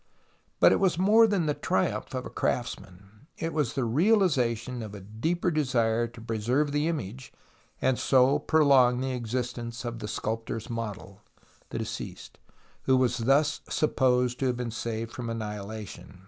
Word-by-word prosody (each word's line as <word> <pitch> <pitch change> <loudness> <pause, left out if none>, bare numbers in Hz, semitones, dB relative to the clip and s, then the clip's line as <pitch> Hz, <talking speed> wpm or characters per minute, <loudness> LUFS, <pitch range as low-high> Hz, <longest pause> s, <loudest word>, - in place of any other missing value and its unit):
But - - +7
it - - +3
was 185 -4 +2
more 215 +5 +6
tha!i 200 -6 +1
the 150 - +1
triumpli - - -1
of - - -3
a - - -7
crafts - - -1
man: 100 +7 -18
it 165 0 -3
was 145 -7 0
the 135 - -1
realization 125 - +2
of 105 -2 -7
a - - -7
deeper 160 - -1
desire 120 -6 +1
to 115 0 -13
preserve 120 +6 0
the 145 +2 +1
image, 130 - -4 0.5
and 130 -1 +1
so 135 +2 +4
prolong 140 -5 +4
the 130 0 -2
existence 120 0 -4
of 120 -1 -4
the 105 - -5
sculptor 115 +2 -3
s 115 - -8
model, 105 -3 -6 0.5
the - - -5
deceased, - - -6 0.5
Avho 130 -1 +5
was 125 -1 +2
thus 140 +5 +2
supposed 125 -4 +1
to 135 - +1
have 125 -1 0
been 120 -2 -3
saved 115 0 -4
from 125 -4 -5
annihilation. 105 -3 -6
125 Hz, 165 wpm, -28 LUFS, 115-145 Hz, 0.5 s, But